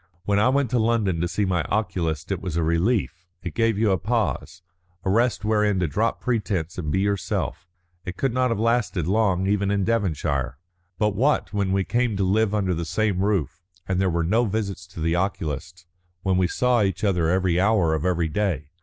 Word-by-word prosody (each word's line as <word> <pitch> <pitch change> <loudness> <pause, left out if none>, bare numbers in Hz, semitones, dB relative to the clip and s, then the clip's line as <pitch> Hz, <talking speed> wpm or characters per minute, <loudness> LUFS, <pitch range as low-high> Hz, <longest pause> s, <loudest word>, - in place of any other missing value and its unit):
When 100 0 +2
I 110 - +4
went 135 -2 +1
to 125 - +2
London 110 -7 +1
to 85 - +1
see 100 +4 -1
my 90 -3 +1
oculist 90 -5 -2
it 95 - -2
was 90 -4 -3
a 85 - +1
relief; 90 +2 0 0.2
it - - -5
gave 115 -2 +1
you 110 -1 +2
a 95 - +1
pause, 105 -4 -2 0.4
a 95 - +2
rest 115 0 +1
wherein 105 -2 +2
to 90 - +1
drop 110 +10 0
pretence 100 -9 -2
and 75 -4 -3
be 95 - +1
yourself. 100 -3 -2 0.4
It 90 +1 -6
could 135 -3 0
not 130 0 +2
have 115 - 0
lasted 115 -7 +1
long 95 -1 +1
even 100 0 +1
in 100 -1 +1
Devonshire. 75 - -1 0.4
But 105 +1 +1
what 125 - +1
when 100 -2 0
we 95 0 +2
came 120 0 0
to 100 - +1
live 105 +3 +2
under 95 -3 +1
the 85 0 -3
same 95 +3 0
roof, 85 -6 -1 0.3
and 95 0 0
there 95 - +2
were 85 -1 0
no 110 +8 +2
visits 100 -4 -3
to 90 - -11
the 80 +1 +1
oculist, 85 -2 -3 0.4
when 95 -1 +1
we 90 -1 +3
saw 125 +4 +2
each 95 0 -1
other 90 -5 +2
every 90 -1 +2
hour 95 -5 +3
of 80 -1 -1
every 85 -2 +1
day? 80 -4 -2
95 Hz, 205 wpm, -24 LUFS, 85-110 Hz, 0.4 s, I